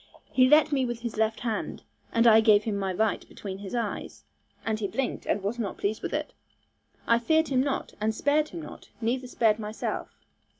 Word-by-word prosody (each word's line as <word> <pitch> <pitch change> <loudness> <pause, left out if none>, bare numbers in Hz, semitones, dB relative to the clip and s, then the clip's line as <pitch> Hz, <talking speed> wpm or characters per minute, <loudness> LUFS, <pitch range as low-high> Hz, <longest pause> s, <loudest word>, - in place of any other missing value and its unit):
He 255 -1 +5
let 300 +2 +7
at 305 - -16
me 275 -2 +2
with 240 -2 -3
his 235 -2 -4
left 220 +1 0
hand, 230 -3 -3 0.3
and 230 0 +3
I 225 -1 +8
gave 215 -2 +5
him 215 -2 -2
my 195 -1 -1
right 215 +3 0
between 195 -2 -7
his 200 +3 -6
eyes, 230 -4 -4 0.4
and 220 -1 0
he 205 - -1
blinked, 270 +5 -3
and 205 - 0
was 220 +5 -2
not 210 -4 -3
pleased 215 +2 -2
with - - -4
it. - - -3 0.7
I 230 0 +4
feared 315 +6 +2
him 260 -2 +3
not, 275 0 -2
and 220 +1 +1
spared 295 +5 +2
him 335 - -7
not, - - -11
neither 250 +3 -1
spared 225 -3 +2
myself. 215 0 -4
230 Hz, 210 wpm, -27 LUFS, 215-255 Hz, 0.7 s, I